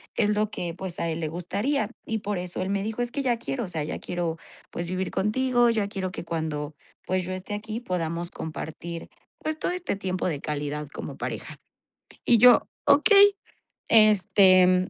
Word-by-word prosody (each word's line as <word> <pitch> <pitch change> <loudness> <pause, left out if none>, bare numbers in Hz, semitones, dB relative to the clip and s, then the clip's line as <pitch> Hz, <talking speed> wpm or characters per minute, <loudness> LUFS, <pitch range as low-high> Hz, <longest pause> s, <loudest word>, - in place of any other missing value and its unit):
es 210 - +2
lo 210 0 +1
que, 170 -5 -4
pues, 185 -2 -6
a 170 - -1
él 160 - -3
le 155 - -1
gustaría, 205 - -1 0.2
y 220 0 -2
por 205 -2 -3
eso 180 0 -5
él 185 - -2
me 200 0 0
dijo: 220 +2 -3
"Es 240 0 -2
que 280 - -2
ya 240 -3 +1
quiero 240 0 -3
o - - -7
sea, 160 -4 -3
ya 150 - -4
quiero, 170 -2 -3 0.3
pues, 170 0 -4
vivir 185 +1 -2
contigo, 240 +3 +2
ya 215 -3 0
quiero 190 -2 -4
que - - -6
cuando, 155 -3 -3 0.3
pues, 185 0 0
yo 185 - -4
esté 185 +2 -6
aquí 215 +2 -5
podamos 170 -5 -3
compartir, 165 +1 -6 0.3
pues, 310 0 -3
todo - - -1
este 360 - -2
tiempo 185 -2 -2
de 150 -5 -2
calidad 150 0 -3
como - - -7
pareja". - - -5 0.7
Y 235 - +5
yo: 245 +1 +7 0.2
"Okey", 400 +7 +6 0.5
este, 185 -4 +5
185 Hz, 190 wpm, -26 LUFS, 170-225 Hz, 0.7 s, yo